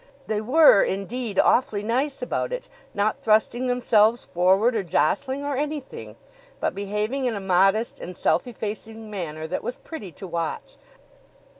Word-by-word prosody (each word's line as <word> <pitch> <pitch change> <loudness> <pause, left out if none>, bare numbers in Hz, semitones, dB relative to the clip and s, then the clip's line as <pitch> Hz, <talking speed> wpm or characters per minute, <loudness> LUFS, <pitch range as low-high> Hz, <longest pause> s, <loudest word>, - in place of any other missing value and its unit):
They 215 -1 -1
were, 260 -1 +6
indeed, 205 +2 -3
awfully 210 -5 +3
nice 260 +5 -1
about 250 - -2
it, - - -5 0.3
not 205 +1 0
thrusting 225 +3 +2
themselves 235 -2 +3
forward 190 +7 +2
or 215 - +1
jostling 190 - 0
or 285 -1 -1
anything, 295 0 -5 0.4
but - - -1
behaving 210 +7 -2
in 240 -3 0
a - - -3
modest 195 +4 +2
and 180 0 -8
self - - +1
effacing 220 -1 -6
manner 160 -6 -5
that 160 - -3
was 250 - -3
pretty 210 - -9
to - - -9
watch. 170 -2 -4
215 Hz, 150 wpm, -24 LUFS, 195-250 Hz, 0.4 s, were